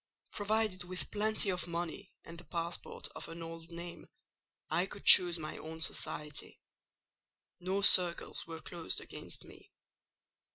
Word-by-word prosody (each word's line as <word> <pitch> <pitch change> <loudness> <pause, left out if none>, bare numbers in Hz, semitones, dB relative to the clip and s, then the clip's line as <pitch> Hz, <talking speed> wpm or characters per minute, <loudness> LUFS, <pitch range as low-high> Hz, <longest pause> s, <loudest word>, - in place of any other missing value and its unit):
Provided 210 -2 -2
with 180 +1 -6
plenty 215 -1 0
of 180 -1 -4
money 170 +3 -6
and 170 0 -11
the - - -13
passport 170 +2 -5
of - - -6
an 165 0 -8
old 165 0 -10
name, 170 0 -9 0.6
I 180 +2 -1
could 200 - -9
choose 175 -1 +9
my 155 -2 -8
own 160 +1 -9
society: 150 -2 -2 1.0
no 190 +3 -2
circles 175 -4 +5
were 165 -1 -8
closed 170 0 -2
against - - -10
me. - - -17
175 Hz, 135 wpm, -32 LUFS, 165-185 Hz, 1.0 s, choose